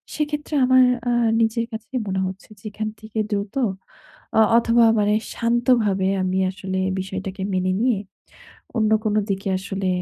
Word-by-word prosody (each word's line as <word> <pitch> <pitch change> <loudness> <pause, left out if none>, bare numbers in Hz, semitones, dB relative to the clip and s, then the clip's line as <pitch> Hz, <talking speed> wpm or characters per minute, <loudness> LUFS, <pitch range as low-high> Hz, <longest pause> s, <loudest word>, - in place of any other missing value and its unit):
সেক্ষেত্রে 300 0 -3
আমার 255 0 +6 0.3
আ - - +2 0.3
নিজের 230 +1 +1
কাছেই 230 +3 -5
মনে 190 0 -1
হচ্ছে 190 +3 -9
যে - - -24
এখান 215 +1 -3
থেকে 215 0 -10
দ্রুত 200 -1 -2 0.8
অ - - +6 0.2
অথবা 235 0 +4 0.2
মানে 210 0 +2 0.2
শান্তভাবে 230 -5 +2
আমি 185 0 0
আসলে 190 -1 -5 0.2
বিষয়টাকে 190 0 -5
মেনে 185 0 +1
নিয়ে 240 -1 +2 0.8
অন্য 215 -1 +2
কোনো 215 -1 +1
দিকে 195 0 -2
আসলে 195 0 -4
210 Hz, 145 wpm, -22 LUFS, 190-235 Hz, 0.8 s, আমার